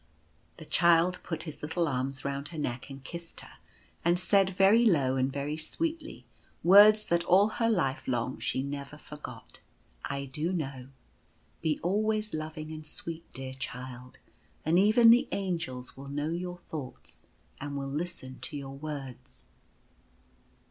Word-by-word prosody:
The -, -, -10 dB
Child 170 Hz, +1 st, +4 dB
put 160 Hz, -2 st, -4 dB
his 155 Hz, -3 st, -7 dB
little 165 Hz, +3 st, 0 dB
arms 135 Hz, 0 st, -2 dB
round 140 Hz, +1 st, -2 dB
her 165 Hz, -, -9 dB
neck 125 Hz, -3 st, -3 dB
and 135 Hz, -1 st, -9 dB
kissed 170 Hz, +3 st, -6 dB
her, -, -, -14 dB, 0.5 s
and 175 Hz, +1 st, +3 dB
said, 190 Hz, 0 st, +3 dB
very 200 Hz, +5 st, +6 dB
low 140 Hz, -, +3 dB
and 130 Hz, +1 st, +1 dB
very 145 Hz, +2 st, -3 dB
sweetly, 320 Hz, -, -4 dB, 0.4 s
words 210 Hz, +4 st, +8 dB
that 170 Hz, 0 st, +1 dB
all 195 Hz, +4 st, +5 dB
her 230 Hz, +1 st, 0 dB
life 170 Hz, -12 st, 0 dB
long 125 Hz, 0 st, -1 dB
she 130 Hz, -, -1 dB
never 140 Hz, +1 st, -5 dB
forgot: 150 Hz, 0 st, -10 dB
cc -, -, -31 dB
I 140 Hz, 0 st, -3 dB
do 150 Hz, +7 st, -2 dB
know. 135 Hz, -7 st, -4 dB, 0.7 s
Be 155 Hz, -2 st, 0 dB
always 215 Hz, +3 st, +1 dB
loving 155 Hz, 0 st, -5 dB
and 155 Hz, 0 st, -7 dB
sweet, 165 Hz, +2 st, -7 dB
dear 130 Hz, 0 st, -5 dB
child, 125 Hz, -1 st, -7 dB, 0.5 s
and 165 Hz, +3 st, +4 dB
even 225 Hz, +3 st, +7 dB
the 240 Hz, +2 st, +5 dB
Angels 165 Hz, -10 st, -3 dB
will 140 Hz, +1 st, -9 dB
know 145 Hz, +2 st, -2 dB
your 180 Hz, +1 st, -3 dB
thoughts 150 Hz, -6 st, -8 dB, 0.4 s
and 140 Hz, 0 st, -4 dB
will 140 Hz, -, -3 dB
listen 140 Hz, -3 st, -5 dB
to 150 Hz, -, -5 dB
your 135 Hz, -1 st, -7 dB
words." 135 Hz, -, -7 dB
155 Hz, 155 wpm, -30 LUFS, 135-180 Hz, 0.7 s, words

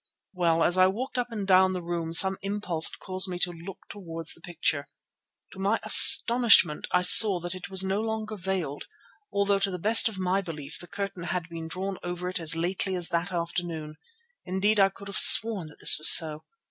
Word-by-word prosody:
"Well, 170 Hz, -3 st, -2 dB
as 180 Hz, +2 st, -1 dB
I 185 Hz, -, +3 dB
walked 245 Hz, +6 st, -7 dB
up 245 Hz, -1 st, -6 dB
and 210 Hz, -3 st, -7 dB
down 185 Hz, 0 st, +1 dB
the 180 Hz, -, -7 dB
room 170 Hz, -1 st, -7 dB
some 190 Hz, +3 st, +2 dB
impulse 195 Hz, -5 st, -2 dB
caused 185 Hz, 0 st, -2 dB
me 180 Hz, -1 st, -8 dB
to 175 Hz, 0 st, -1 dB
look 175 Hz, +3 st, -14 dB
towards 165 Hz, -5 st, -8 dB
the -, -, -16 dB
picture. 155 Hz, -4 st, -5 dB, 0.6 s
To 190 Hz, -, -15 dB
my 200 Hz, +4 st, -3 dB
astonishment 230 Hz, -10 st, +5 dB
I 180 Hz, -, -1 dB
saw 190 Hz, +1 st, +6 dB
that 175 Hz, +1 st, -8 dB
it 185 Hz, -1 st, -12 dB
was 190 Hz, -1 st, -1 dB
no 190 Hz, +2 st, -4 dB
longer 220 Hz, -1 st, -7 dB
veiled, 180 Hz, -7 st, -7 dB, 0.5 s
although 200 Hz, 0 st, -2 dB
to 195 Hz, 0 st, -3 dB
the 180 Hz, -, -7 dB
best 220 Hz, +5 st, +2 dB
of 210 Hz, -, -13 dB
my 185 Hz, +1 st, -3 dB
belief 155 Hz, -6 st, -11 dB
the 175 Hz, -, -12 dB
curtain 200 Hz, -3 st, -9 dB
had 180 Hz, -1 st, -7 dB
been 165 Hz, -1 st, -10 dB
drawn 190 Hz, +3 st, -8 dB
over 175 Hz, 0 st, -8 dB
it 185 Hz, -, -7 dB
as 160 Hz, -1 st, 0 dB
lately 185 Hz, +3 st, -5 dB
as 175 Hz, -2 st, -4 dB
that 170 Hz, +3 st, -5 dB
afternoon; 170 Hz, -3 st, -7 dB, 0.5 s
indeed 200 Hz, +3 st, -3 dB
I 195 Hz, 0 st, +2 dB
could 200 Hz, +1 st, -16 dB
have 200 Hz, -, -3 dB
sworn 210 Hz, -7 st, +6 dB
that 150 Hz, -, -19 dB
this -, -, +4 dB
was 155 Hz, -, +9 dB
so. 155 Hz, -2 st, +4 dB
185 Hz, 205 wpm, -23 LUFS, 170-195 Hz, 0.6 s, was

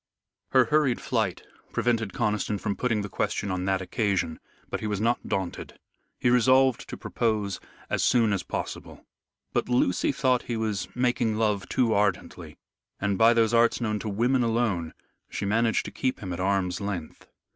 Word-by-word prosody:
Her -, -, +5 dB
hurried 150 Hz, -5 st, +2 dB
flight 110 Hz, -7 st, -1 dB, 0.3 s
prevented 115 Hz, -4 st, 0 dB
Conniston 105 Hz, -4 st, -1 dB
from 100 Hz, -, -2 dB
putting 115 Hz, -5 st, 0 dB
the -, -, -4 dB
question 100 Hz, 0 st, -2 dB
on 90 Hz, 0 st, -2 dB
that 95 Hz, -1 st, 0 dB
occasion. 95 Hz, -5 st, -1 dB, 0.3 s
But -, -, -3 dB
he 110 Hz, -, -3 dB
was 105 Hz, -2 st, -2 dB
not 115 Hz, +2 st, 0 dB
daunted. 95 Hz, -3 st, -4 dB, 0.4 s
He 120 Hz, -, +2 dB
resolved 130 Hz, +1 st, +4 dB
to -, -, -6 dB
propose 105 Hz, -4 st, -1 dB, 0.3 s
as -, -, 0 dB
soon 115 Hz, -4 st, +3 dB
as 95 Hz, -, 0 dB
possible. -, -, -6 dB, 0.5 s
But -, -, 0 dB
Lucy 125 Hz, -7 st, +2 dB
thought 130 Hz, -2 st, +1 dB
he 120 Hz, -, -4 dB
was 110 Hz, -3 st, -2 dB
making 120 Hz, -3 st, +1 dB
love 105 Hz, -4 st, 0 dB
too 120 Hz, -4 st, +2 dB
ardently, 100 Hz, -3 st, -1 dB, 0.4 s
and 100 Hz, 0 st, 0 dB
by 115 Hz, +4 st, +5 dB
those 115 Hz, 0 st, +3 dB
arts 115 Hz, 0 st, +4 dB
known 110 Hz, -3 st, -1 dB
to 110 Hz, -, -4 dB
women 120 Hz, +6 st, +2 dB
alone, 110 Hz, -8 st, 0 dB, 0.3 s
she 100 Hz, -, -4 dB
managed 110 Hz, +3 st, +1 dB
to -, -, -6 dB
keep 130 Hz, -1 st, -2 dB
him 95 Hz, -3 st, -5 dB
at 85 Hz, -, -5 dB
arm's 95 Hz, 0 st, 0 dB
length. 95 Hz, -6 st, -5 dB
110 Hz, 170 wpm, -26 LUFS, 100-120 Hz, 0.5 s, Her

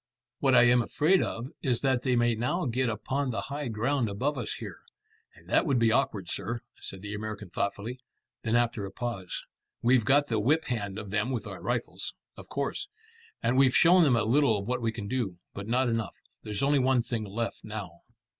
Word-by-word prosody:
"What -, -, +4 dB
I -, -, +8 dB
am 120 Hz, 0 st, +5 dB
afraid 160 Hz, +10 st, +3 dB
of 120 Hz, +3 st, -3 dB
is 125 Hz, -5 st, +1 dB
that 130 Hz, -3 st, +2 dB
they 125 Hz, -1 st, +1 dB
may 120 Hz, 0 st, +3 dB
now 125 Hz, +11 st, -1 dB
get 125 Hz, 0 st, 0 dB
upon 130 Hz, +5 st, -2 dB
the 115 Hz, -, -2 dB
high 145 Hz, 0 st, -4 dB
ground 120 Hz, +2 st, 0 dB
above 130 Hz, +9 st, -1 dB
us 120 Hz, -5 st, -3 dB
here." -, -, -8 dB, 0.6 s
"And -, -, -19 dB
that -, -, +3 dB
would 135 Hz, -, +3 dB
be 115 Hz, -1 st, +4 dB
awkward, 110 Hz, -7 st, +1 dB
sir," 110 Hz, +6 st, -2 dB, 0.2 s
said 95 Hz, 0 st, -7 dB
the 105 Hz, 0 st, -5 dB
American 105 Hz, -2 st, -6 dB
thoughtfully. 105 Hz, +6 st, -3 dB, 0.4 s
Then 115 Hz, 0 st, 0 dB
after 120 Hz, -3 st, +1 dB
a -, -, -9 dB
pause 100 Hz, -5 st, -4 dB, 0.4 s
"We've 120 Hz, 0 st, +4 dB
got 140 Hz, +5 st, +4 dB
the 115 Hz, -6 st, 0 dB
whip 150 Hz, +9 st, +2 dB
hand 100 Hz, -5 st, -3 dB
of 105 Hz, -2 st, -6 dB
them 110 Hz, +3 st, 0 dB
with 125 Hz, -3 st, -2 dB
our -, -, -7 dB
rifles." -, -, -2 dB, 0.2 s
"Of -, -, -12 dB
course." -, -, -2 dB, 0.6 s
"And 125 Hz, +3 st, +3 dB
we've 130 Hz, -2 st, +5 dB
shown 180 Hz, +2 st, +7 dB
them 140 Hz, -7 st, +5 dB
a 115 Hz, -, +2 dB
little 120 Hz, 0 st, +3 dB
of 100 Hz, -, -5 dB
what 125 Hz, 0 st, -1 dB
we 115 Hz, -1 st, 0 dB
can 110 Hz, -2 st, -6 dB
do, 110 Hz, -7 st, -2 dB, 0.2 s
but 100 Hz, +1 st, -6 dB
not 125 Hz, +3 st, +2 dB
enough. 115 Hz, -3 st, -1 dB, 0.3 s
There's 105 Hz, +3 st, -3 dB
only 140 Hz, 0 st, +4 dB
one 130 Hz, -2 st, +3 dB
thing 115 Hz, -2 st, -3 dB
left 110 Hz, +3 st, -4 dB
now." 100 Hz, -6 st, -7 dB
120 Hz, 210 wpm, -29 LUFS, 105-130 Hz, 0.6 s, I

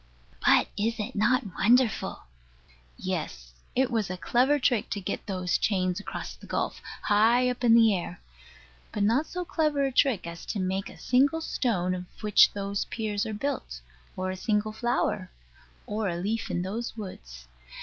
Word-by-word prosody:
But -, -, +5 dB
is 225 Hz, +3 st, 0 dB
it 215 Hz, +5 st, -3 dB
not 240 Hz, +6 st, +3 dB
wonderful? 240 Hz, +2 st, +2 dB, 0.7 s
Yes: -, -, -4 dB, 0.2 s
it 260 Hz, 0 st, +2 dB
was 220 Hz, -5 st, 0 dB
a 185 Hz, -, -4 dB
clever 255 Hz, +9 st, +3 dB
trick 250 Hz, -5 st, +1 dB
to 205 Hz, -, -2 dB
get 195 Hz, +1 st, -4 dB
those 185 Hz, -2 st, 0 dB
chains 185 Hz, -3 st, +1 dB
across 205 Hz, -, -6 dB
the -, -, -14 dB
gulf, -, -, -2 dB, 0.2 s
high 230 Hz, +4 st, +4 dB
up 250 Hz, 0 st, -7 dB
in 230 Hz, -1 st, +6 dB
the 225 Hz, -3 st, +6 dB
air: 175 Hz, -1 st, -5 dB, 0.7 s
but 205 Hz, -, -1 dB
not 235 Hz, +9 st, +2 dB
so 360 Hz, 0 st, -4 dB
clever 305 Hz, -4 st, +1 dB
a 270 Hz, -, -1 dB
trick 250 Hz, -8 st, +2 dB
as 170 Hz, 0 st, -7 dB
to 205 Hz, -, -2 dB
make 190 Hz, +1 st, -1 dB
a -, -, -13 dB
single 280 Hz, +6 st, +2 dB
stone 195 Hz, -, 0 dB
of 180 Hz, 0 st, -4 dB, 0.2 s
which 210 Hz, -1 st, +6 dB
those 200 Hz, 0 st, -2 dB
piers 215 Hz, -2 st, -2 dB
are 220 Hz, -, -4 dB
built, 260 Hz, -, -3 dB, 0.4 s
or 185 Hz, 0 st, -2 dB
a -, -, -4 dB
single 210 Hz, +2 st, 0 dB
flower 220 Hz, -4 st, -1 dB, 0.6 s
or 205 Hz, -4 st, -2 dB
leaf 205 Hz, +6 st, -2 dB
in 175 Hz, -, -1 dB
those 225 Hz, +5 st, -4 dB
woods. 60 Hz, -, -9 dB
210 Hz, 170 wpm, -27 LUFS, 185-245 Hz, 0.7 s, in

